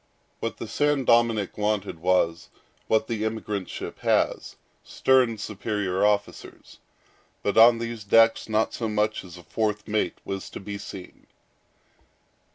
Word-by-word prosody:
What - - -4
the - - -6
San 145 -2 +1
Dominick 115 -4 +2
wanted 105 -5 -1
was, 85 -1 +1 0.4
what 110 0 +2
the 110 -2 -2
emigrant 105 -3 -3
ship - - -7
has, - - 0 0.3
stern 125 -4 +2
superior 105 -2 -2
officers. 105 0 -2 0.6
But 100 - 0
on 115 +1 +7
these 115 -1 -5
decks 115 +3 +4
not 110 0 +1
so 115 -2 -3
much 105 0 0
as 90 -2 -12
a 90 - -13
fourth 105 0 -2
mate 110 0 -1
was 95 -1 -5
to - - -8
be 100 +1 -6
seen. 95 -2 -10
105 Hz, 140 wpm, -25 LUFS, 100-115 Hz, 0.6 s, on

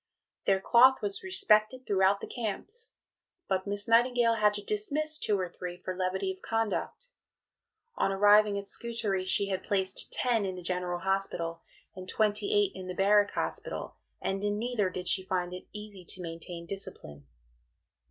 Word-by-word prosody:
Their 195 -1 +3
cloth 250 +4 +5
was 200 -1 -2
respected 255 - +2
throughout 195 0 +3
the - - -5
camps; 265 - -4 0.5
but 190 0 -1
Miss 205 0 -1
Nightingale 235 0 +4
had 210 -2 +3
to 205 - -5
dismiss 295 +10 -1
two 205 -2 +1
or 185 - -1
three 175 0 -7
for 185 0 -5
levity 185 - -1
of 380 0 -10
conduct. 225 - -2 0.9
On - - +2
arriving 205 +1 +5
at 200 - -4
Scutari, 210 -4 -2
she 200 +1 +3
had 190 -1 -1
placed 190 -2 -1
ten 235 -4 +1
in 190 -1 -3
the 180 - -8
General 180 0 -2
Hospital 175 -3 -2 0.3
and 185 -1 -8
twenty 210 -1 +1
eight 205 -2 +3
in 185 -1 -8
the 185 - -5
Barrack 205 +2 +4
Hospital, - - -3 0.2
and 195 +1 -2
in 205 0 0
neither 225 -4 0
did 180 -1 -6
she 190 - +2
find 180 -1 -2
it 180 - -8
easy 210 -3 -8
to 180 +1 -3
maintain 170 +1 -7
discipline. 75 - -7
200 Hz, 165 wpm, -30 LUFS, 185-215 Hz, 0.9 s, cloth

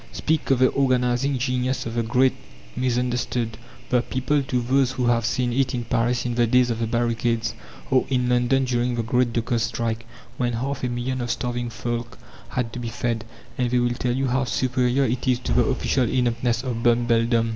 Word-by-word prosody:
Speak 160 -1 -1
of 135 - +4
the 130 +1 +5
organizing 130 0 +1
genius 125 0 -1
of 115 - -4
the 120 - 0
"Great 125 +3 +3 0.4
Misunderstood," 125 -2 -1 0.4
the 125 -1 +4
people, 130 +4 0
to 130 -2 -1
those 130 +1 +2
who 125 - -1
have 120 -1 +2
seen 125 -1 0
it 130 0 +1
in 120 - -2
Paris 120 +1 0
in 120 - -1
the 120 0 +2
days 125 +1 +3
of 115 - -3
the 115 - 0
barricades, 115 0 0 0.4
or 130 -1 +3
in 125 -2 +1
London 125 +2 +2
during 120 -1 0
the 115 - -1
great 125 +1 +1
dockers' 115 0 0
strike, 115 +1 -2 0.3
when 120 -1 0
half 135 +4 -3
a 125 - 0
million 125 +1 -2
of 120 - -3
starving 120 +1 -2
folk 120 +1 -4 0.3
had 115 -3 -2
to 125 - -5
be 120 -1 -4
fed, 115 0 -2 0.3
and 125 -1 +1
they 125 - +2
will 120 0 +2
tell 120 0 -1
you 135 +1 0
how 130 +1 +1
superior 125 +1 +1
it 125 +2 -2
is 125 -1 +3
to 125 - -3
the 120 - +4
official 130 -2 +1
ineptness 120 -1 0
of 120 -3 -3
Bumbledom. 115 -1 +2
120 Hz, 200 wpm, -24 LUFS, 120-130 Hz, 0.4 s, the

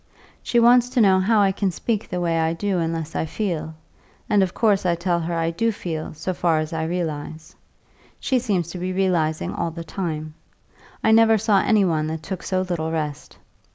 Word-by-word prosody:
She 240 - +1
wants 245 +1 +5
to 255 0 0
know 190 -4 +5
how 210 +3 +3
I 195 -1 +4
can 195 0 -1
speak 210 +4 -3
the 180 - -2
way 165 -2 0
I 160 0 +1
do 190 +1 -1
unless 165 -1 -3
I 160 - -1
feel; 160 -4 -3 0.5
and 205 -1 +3
of 190 -2 +1
course 210 -2 +2
I 175 -2 +2
tell 170 0 0
her 170 +1 -3
I 165 0 0
do 225 +7 0
feel, 160 -7 -5
so 165 +4 -3
far 170 -2 +1
as 155 +1 -3
I 160 0 -2
realise. 160 -2 -4 0.6
She 260 - +1
seems 190 -8 -1
to 180 - -6
be 185 +1 -3
realising 175 -5 0
all 170 - -2
the 165 +1 -7
time; 155 -2 -4 0.7
I 220 - +4
never 225 0 +6
saw 210 -2 +3
any 210 -3 +3
one 155 -3 0
that 160 0 -5
took 190 -2 -5
so 185 -1 -1
little 170 -3 -2
rest. 150 -3 -4
175 Hz, 205 wpm, -22 LUFS, 160-200 Hz, 0.7 s, never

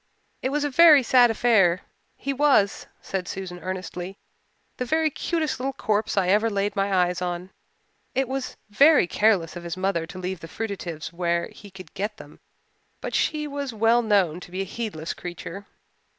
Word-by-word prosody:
It 260 - -1
was 295 +2 0
a 290 - 0
very 305 -1 +7
sad 245 0 +5
affair. 210 -6 +3 0.4
He 275 - -3
was," 270 -8 +2 0.2
said 185 -2 -3
Susan 185 -2 -6
earnestly, 185 0 -6 0.6
"the - - -1
very 315 +4 +1
cutest 320 -2 -2
little 270 +2 -2
corpse 215 -3 -1
I 185 -2 +2
ever 215 +4 +3
laid 200 0 -1
my 200 0 0
eyes 180 -1 +1
on. 180 +1 -4 0.6
It 265 -1 +1
was 265 0 -4
very 285 - +6
careless 185 -3 +2
of 175 - -7
his 170 +1 -5
mother 185 -3 -1
to 185 - -10
leave 185 0 -4
the 165 - -9
fruitatives 180 -6 -5
where 170 -1 -1
he 205 - -13
could 185 -4 -13
get 205 +2 -3
them, - - -13 0.6
but - - -6
she 305 -1 0
was 280 -4 -5
well 225 +2 +4
known 195 -7 +2
to 180 - -12
be 185 +2 -4
a 195 - -6
heedless 195 -9 -4
creature. 175 +3 -8
200 Hz, 180 wpm, -25 LUFS, 180-250 Hz, 0.6 s, very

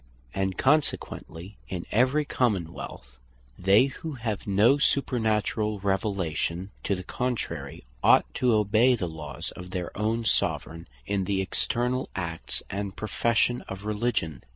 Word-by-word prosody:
And 95 -1 -1
Consequently 105 - 0
in 90 -2 -4
every 130 +7 +3
Common 100 - 0
wealth, - - -9 0.4
they 95 +7 +6
who 150 +3 -6
have 110 -6 -4
no 105 +8 +5
supernaturall 110 -6 +1
Revelation 95 -2 -1
to 100 - +1
the 90 - -6
contrary, 125 +5 -3 0.2
ought - - +6
to 125 -1 +2
obey 110 +4 +4
the 95 -6 -2
laws 80 -1 -6
of 90 0 -9
their 90 -1 -4
own 110 +2 0
Soveraign, 80 -4 0 0.2
in 95 +3 0
the 95 0 0
externall 125 +5 0
acts 85 -3 -3
and 100 0 -3
profession 115 +2 +1
of 95 +2 -6
Religion. 105 - -1
105 Hz, 130 wpm, -27 LUFS, 95-120 Hz, 0.4 s, they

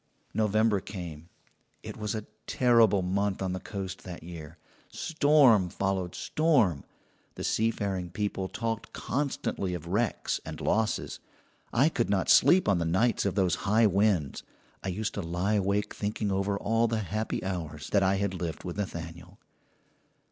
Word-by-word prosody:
"November 110 -1 +2
came. 85 -5 -8 0.5
It - - -7
was 105 0 -3
a 110 -1 -4 0.2
terrible 115 -6 +4
month 100 +2 0
on 95 -1 -2
the 95 - -3
coast 95 -2 -6
that 90 -3 -8
year. 80 -1 -9 0.3
Storm 145 - +4
followed 95 -1 -2
storm; 125 - +2 0.5
the - - -6
sea 110 +1 +2
faring 95 -5 -3
people 95 0 -2
talked 115 +2 -4
constantly 125 -9 -2
of 85 -2 -7
wrecks 105 +5 -1
and - - -7
losses. 110 0 0 0.5
I 135 +5 +4
could 120 -9 0
not 100 -2 +1
sleep 185 +1 +6
on 100 -4 +3
the - - 0
nights 100 +7 +1
of 95 - -2
those 95 -4 +2 0.2
high 110 +2 +5
winds. 100 -8 +2 0.4
I - - -4
used 100 +4 -2
to 100 - -3
lie 90 +4 -1
awake 100 0 0
thinking 105 0 -2
over 100 +1 0
all 115 +3 +1
the 110 -1 -1
happy 110 +3 -3
hours 80 -5 -5
that 100 - +4
I 95 0 +3
had 100 -1 -1
lived 85 -3 -4
with 90 +1 -6
Nathaniel. 85 -1 -6
100 Hz, 155 wpm, -28 LUFS, 90-110 Hz, 0.5 s, sleep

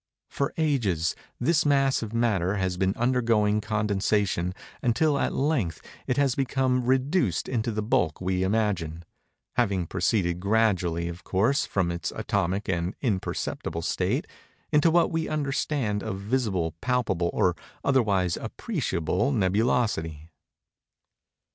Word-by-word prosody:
For 140 +2 -1
ages, 110 - +1 0.2
this 155 +5 +2
mass 135 -2 +3
of 110 -2 -5
matter 105 -5 +1
has 95 -2 -1
been 95 +2 0
undergoing 115 -4 +2
condensation, 105 -3 0 0.3
until 140 +5 +2
at - - 0
length 135 - 0 0.3
it 125 - 0
has 140 -3 +3
become 130 -1 +1
reduced 130 - +1
into 120 -2 -1
the 105 0 -2
bulk 90 -7 +1
we 95 0 -1
imagine; 95 -5 -1 0.5
having 100 -7 +1
proceeded 90 0 0
gradually, 95 -5 +1
of 85 +1 -7
course, 115 +12 +1
from 90 -3 0
its 85 0 -3
atomic 95 +4 -1
and 90 0 -1
imperceptible 95 - -2
state, 100 - 0 0.5
into 150 +1 +4
what 170 +2 +3
we 165 -1 -1
understand 140 -7 -1
of 95 - -4
visible, 100 -7 -1
palpable, 115 -9 0
or 90 -1 +2 0.3
otherwise 100 -10 +2
appreciable 110 - -1
nebulosity. 100 - 0
105 Hz, 125 wpm, -26 LUFS, 90-130 Hz, 0.5 s, into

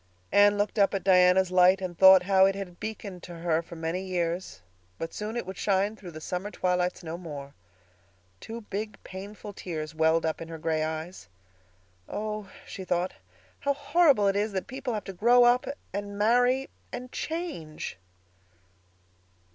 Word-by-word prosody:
Anne 205 0 +5
looked 205 +1 -1
up 200 0 +4
at 195 - -2
Diana's 185 0 +5
light 185 +1 +5
and 185 -2 -5
thought 190 0 +8
how 190 0 +5
it 195 - 0
had 185 -3 -7
beaconed 205 -4 -6
to 175 - -9
her 165 -1 0
for 170 - -11
many 165 +3 -2
years; 175 - -2 0.4
but 165 - -5
soon 215 +3 -4
it 240 - -3
would 190 0 -7
shine 200 +1 +1
through 190 -4 -10
the 155 -2 -9
summer 180 +5 -4
twilights 180 -2 -1
no 165 +1 -5
more. 145 -5 -8 0.9
Two 230 +1 -7
big, 210 +1 -5
painful 205 +2 -8
tears 155 -5 -5
welled 160 +1 +2
up 160 0 -2
in 165 - -6
her 165 0 -7
gray 160 0 -1
eyes. 160 - -5 0.8
"Oh," 210 -1 -4 0.2
she 190 - -7
thought, 180 0 -1 0.5
"how 280 0 0
horrible 285 -6 +4
it 195 - +2
is 205 +1 0
that 190 - -2
people 260 -2 -4
have 210 - -3
to 195 - -7
grow 240 +6 +5
up—and 240 -5 0
marry—and 245 +3 0
_change! 310 - -4
190 Hz, 165 wpm, -28 LUFS, 175-210 Hz, 0.9 s, thought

